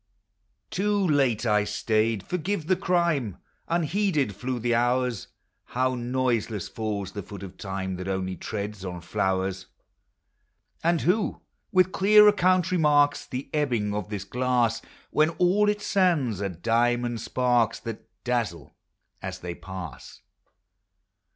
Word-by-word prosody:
Too 205 +2 +1
late 135 -7 +2
I 105 -2 +3
stayed, 110 0 0
— - - -25
forgive 180 -1 -2
the 185 +3 +3
crime! 170 - 0 0.3
Unheeded 170 - +1
tlew 125 +5 -4
the 120 +1 0
hours: 120 -1 +1 0.4
How 130 +1 0
noiseless 120 -4 -1
falls 105 -3 -4
the 100 - -5
foot 100 +1 -9
of 95 -1 -9
Time 95 -1 -4
That 90 +1 -6
only 95 -1 -2
treads 105 0 -5
on 90 -2 -5
tlowers! 95 +2 -1 1.2
And 170 0 +2
who, 200 +5 +1 0.3
with 185 0 +4
clear 210 +3 +6
account, 185 -3 +3
remarks 150 -4 +3
The 130 +2 -5
ebbings 120 -9 0
of 105 -1 -3
this 105 -3 -4
glass, 125 0 +1 0.3
When 155 +1 +3
all 200 +4 +3
its 210 0 -2
sands 150 - +2
are 100 - -1
diamond 120 +5 0
sparks, 120 -1 +1
That 115 -2 -7
dazzle 115 - -2 0.5
as - - -5
they 90 -1 -4
pass? 95 -4 -9
120 Hz, 130 wpm, -26 LUFS, 100-155 Hz, 1.2 s, clear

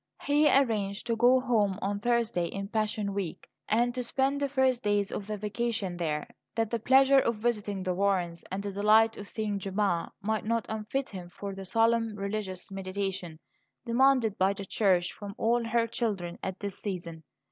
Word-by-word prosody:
He 295 +1 +4
arranged 215 -7 +1
to 235 -1 0
go 245 +3 +5
home 215 -7 +1
on 200 0 -2
Thursday 230 -6 +1
in 195 +2 -5
Passion 215 -2 -1
week, 195 -5 -4 0.2
and 240 +3 +2
to 250 - -2
spend 270 +3 0
the 280 - +1
first 260 -2 +2
days 205 -2 +1
of 200 - -5
the 215 0 -3
vacation 215 -2 -2
there, 155 -3 -2 0.3
that 225 -2 0
the 235 - 0
pleasure 270 +3 +6
of 235 -3 +1
visiting 210 -3 -2
the 185 -1 0
Warrens 180 -3 0
and 195 +2 -3
the 200 - -3
delight 215 +3 +4
of 205 - -8
seeing 210 -2 -2
Gemma 195 -3 -1
might 215 +1 -1
not 230 0 0
unfit 220 +5 -3
him 180 -3 -8
for 200 +2 -6
the 195 0 -7
solemn 225 +2 +2
religious 200 -2 -4
meditation 190 -3 -4 0.5
demanded 240 -3 +3
by 190 +1 +3
the 200 0 -7
Church 185 -3 +2
from 200 -1 -8
all 235 +1 +2
her 230 0 +2
children 205 -8 -3
at 190 0 -5
this 200 -2 -5
season. 170 -5 -5
210 Hz, 180 wpm, -29 LUFS, 195-235 Hz, 0.5 s, pleasure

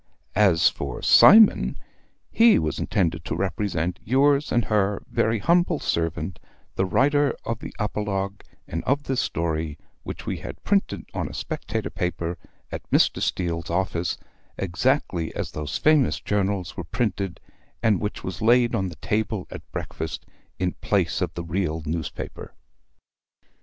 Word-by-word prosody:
As 95 -5 +5
for - - -3
Cymon, 220 0 +7 0.5
he 230 0 +6
was 75 -2 -1
intended 85 -3 0
to - - -2
represent 90 -2 -1
yours 140 +4 +3
and 120 -3 +2
her 105 -1 +1
very 110 +1 +1
humble 170 - +2
servant, 80 - -2 0.4
the 95 - +1
writer 145 +6 +3
of 115 -1 -2
the - - -7
apologue 105 -2 -2 0.2
and 80 - -4
of 140 +2 +1
this 130 -3 0
story, 80 -2 -2 0.2
which - - -7
we - - -2
had - - -9
printed 200 -1 0
on - - -2
a - - -9
"Spectator" 110 -2 -4
paper 90 -2 -3 0.3
at - - -4
Mr. - - +3
Steele's 85 -2 -1
office, 90 -1 -1 0.4
exactly 95 - 0
as - - -3
those 75 -1 -3
famous 155 -4 +3
journals 100 -3 -1
were 85 - -4
printed, 100 0 -2 0.4
and 110 -4 +3
which 105 0 -4
was 95 +2 -5
laid 120 +1 +4
on 95 -1 0
the 85 - -9
table 105 +4 -2
at - - -10
breakfast 80 0 -5 0.3
in 90 -1 0
place 95 -5 +1
of 90 -3 0
the 85 - -4
real 85 -2 -2
newspaper. 80 +1 -5
95 Hz, 145 wpm, -24 LUFS, 85-115 Hz, 0.5 s, Cymon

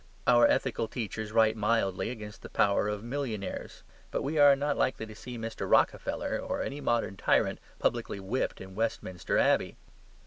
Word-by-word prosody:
Our 120 -1 +6
ethical 120 -3 0
teachers 110 -2 -5
write 110 0 +4
mildly 105 -3 0
against 110 -2 -8
the - - -9
power 100 0 +2
of 105 0 -3
millionaires; 120 -5 -4 0.3
but - - -2
we 150 +2 -1
are 145 -1 +8
not 145 +1 -1
likely 120 -3 0
to 110 - -10
see 120 +3 -8
Mr. 115 0 -5
Rockefeller, - - +1
or - - -3
any 145 +1 -5
modern 115 -6 0
tyrant, - - +2 0.2
publicly - - -1
whipped 100 +7 -2
in 95 0 -10
Westminster 95 -5 -2
Abbey. - - +2
115 Hz, 165 wpm, -29 LUFS, 105-125 Hz, 0.3 s, are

